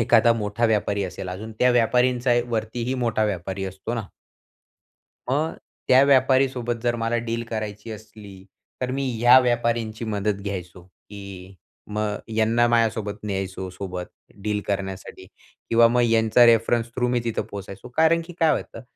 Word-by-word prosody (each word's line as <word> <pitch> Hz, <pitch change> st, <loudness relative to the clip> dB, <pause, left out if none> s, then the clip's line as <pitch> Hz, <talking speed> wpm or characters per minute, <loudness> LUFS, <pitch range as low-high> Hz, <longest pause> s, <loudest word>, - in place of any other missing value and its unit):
एखादा 115 Hz, +1 st, +5 dB
मोठा 110 Hz, +1 st, -2 dB
व्यापारी 105 Hz, -2 st, 0 dB
असेल 90 Hz, 0 st, -6 dB
अजून 105 Hz, +5 st, -6 dB
त्या 125 Hz, -, +4 dB
व्यापारींचा 125 Hz, +1 st, +2 dB, 0.2 s
वरती 110 Hz, +1 st, -2 dB
ही 130 Hz, -, -1 dB
मोठा 110 Hz, -2 st, +1 dB
व्यापारी 95 Hz, -1 st, -3 dB
असतो 95 Hz, +5 st, -5 dB
ना? 115 Hz, -, -2 dB, 1.3 s
मग 155 Hz, +4 st, 0 dB, 0.3 s
त्या 130 Hz, +1 st, +6 dB
व्यापारीसोबत 130 Hz, -3 st, +3 dB
जर 120 Hz, -1 st, +1 dB
मला 115 Hz, 0 st, -1 dB
डील 115 Hz, +1 st, -2 dB
करायची 110 Hz, 0 st, -5 dB
असली 105 Hz, -3 st, -12 dB, 0.4 s
तर 125 Hz, 0 st, -1 dB
मी 135 Hz, +1 st, -2 dB
ह्या 120 Hz, +2 st, +7 dB
व्यापाऱ्यांची 115 Hz, -2 st, -1 dB
मदत 105 Hz, -2 st, -2 dB
घ्यायचो 90 Hz, -3 st, -6 dB
की 95 Hz, 0 st, -12 dB, 0.3 s
मग 105 Hz, 0 st, -2 dB, 0.2 s
यांना 115 Hz, +2 st, +3 dB
माझ्यासोबत 115 Hz, -3 st, +1 dB
न्यायचो 95 Hz, -2 st, -4 dB
सोबत 90 Hz, -1 st, -6 dB, 0.4 s
डील 105 Hz, -1 st, -1 dB
करण्यासाठी 95 Hz, -1 st, -4 dB, 0.4 s
किंवा 115 Hz, 0 st, +6 dB
मग 120 Hz, +1 st, +2 dB
यांचा 115 Hz, +1 st, +5 dB
रेफरन्स 115 Hz, 0 st, +3 dB
थ्रू 125 Hz, -1 st, +1 dB
मी 125 Hz, 0 st, +1 dB
तिथं 115 Hz, -2 st, -1 dB
पोहोचायचो. 100 Hz, +2 st, -8 dB
कारण 160 Hz, +1 st, +4 dB
की 175 Hz, -, -10 dB
काय 160 Hz, -1 st, +4 dB
होतं -, -, -4 dB
110 Hz, 150 wpm, -23 LUFS, 100-120 Hz, 1.3 s, ह्या